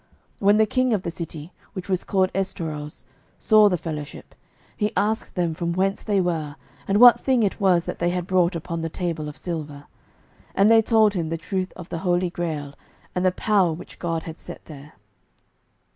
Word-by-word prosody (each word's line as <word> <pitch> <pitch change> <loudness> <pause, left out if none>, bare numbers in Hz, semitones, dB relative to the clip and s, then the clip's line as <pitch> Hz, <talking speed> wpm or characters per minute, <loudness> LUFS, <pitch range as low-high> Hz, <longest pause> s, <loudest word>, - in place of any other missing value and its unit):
When 205 +1 +4
the 220 - +5
king 255 +2 +1
of 195 - -3
the 170 - -3
city, 165 0 -7 0.2
which 185 -3 -6
was 185 -2 0
called 190 -1 +1
Estorause, 155 -6 -4 0.3
saw 215 -1 +5
the 180 - 0
fellowship, 150 -3 -7 0.4
he 210 -1 -1
asked 215 +3 -1
them 175 -3 0
from 170 +1 -2
whence 195 +2 0
they 205 -2 +1
were, 160 -5 -1 0.3
and 200 +1 +2
what 240 -1 +9
thing 255 -3 +2
it 200 +1 -1
was 180 -3 +4
that - - -6
they 175 - +1
had 180 0 -2
brought 185 -1 +2
upon 165 0 -4
the 165 - -3
table 165 -3 -3
of 150 - -11
silver. 150 -5 -5 0.7
And 200 +3 +5
they 225 0 +7
told 220 -2 +3
him 170 -5 -2
the 165 - -2
truth 185 +3 -3
of 180 -1 -10
the 165 - -4
Holy 180 0 0
Grail, 155 -5 -4 0.4
and 180 - -1
the 185 - +4
power 195 -2 +2
which 160 - -11
God 165 -2 -2
had 160 0 -8
set - - -10
there. 150 -1 -12
180 Hz, 195 wpm, -23 LUFS, 165-200 Hz, 0.7 s, what